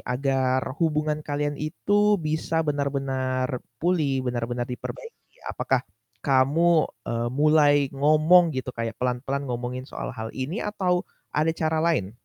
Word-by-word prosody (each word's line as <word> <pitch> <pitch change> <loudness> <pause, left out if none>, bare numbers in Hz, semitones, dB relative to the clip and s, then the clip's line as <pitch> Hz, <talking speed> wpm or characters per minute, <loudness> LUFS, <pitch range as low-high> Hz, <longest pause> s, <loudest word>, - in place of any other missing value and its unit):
agar 130 0 0 0.2
hubungan 155 -2 +1
kalian 145 0 -2
itu 205 +7 +2
bisa 160 -1 -1
benar-benar 135 -3 -1 0.2
pulih, 150 -5 0
benar-benar 120 0 -2
diperbaiki? 455 - -9
Apakah 130 -1 -1 0.4
kamu, 150 +5 +3 0.2
eee, 120 0 -1
mulai 150 +2 +4 0.2
ngomong 155 +5 +5
gitu, 130 0 -3
kayak 115 -2 -4
pelan-pelan 125 +3 -2
ngomongin 125 0 -4
soal - - -6
hal 110 0 -5
ini 135 +9 -4
atau 185 -4 0 0.3
ada 155 +2 +2
cara 160 0 0
lain? 115 - 0
140 Hz, 120 wpm, -25 LUFS, 130-160 Hz, 0.4 s, ngomong